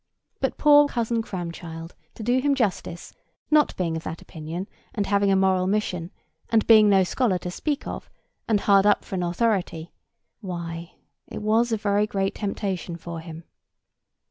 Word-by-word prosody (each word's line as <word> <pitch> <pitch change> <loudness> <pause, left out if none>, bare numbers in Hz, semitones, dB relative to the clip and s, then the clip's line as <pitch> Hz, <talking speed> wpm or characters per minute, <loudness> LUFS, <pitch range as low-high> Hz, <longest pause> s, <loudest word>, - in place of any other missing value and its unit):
But - - -1
poor 290 -1 +6
Cousin 235 -3 -1
Cramchild, 170 -4 -7 0.2
to 220 - -7
do 245 +3 +2
him 280 +1 +2
justice, 195 -8 -2 0.4
not 300 -1 +4
being 170 -3 -1
of 160 - -3
that 160 0 -6
opinion, 165 +4 -7 0.3
and 205 -3 0
having 200 0 +2
a - - +4
moral 190 -1 +2
mission, 185 -4 -1 0.4
and 225 -1 +3
being 215 -2 +7
no 195 -1 +5
scholar 200 +1 +1
to 180 0 -6
speak 295 - -2
of, - - -6 0.4
and 210 -3 +2
hard 200 0 +5
up - - +3
for - - -10
an 185 - -1
authority—why, 175 -2 -4 0.3
it - - -7
was 225 +3 +2
a 225 - +2
very 205 0 +1
great 195 -2 -1
temptation 195 -4 -3
for 170 0 -7
him. 165 0 -9
195 Hz, 165 wpm, -25 LUFS, 175-220 Hz, 0.4 s, being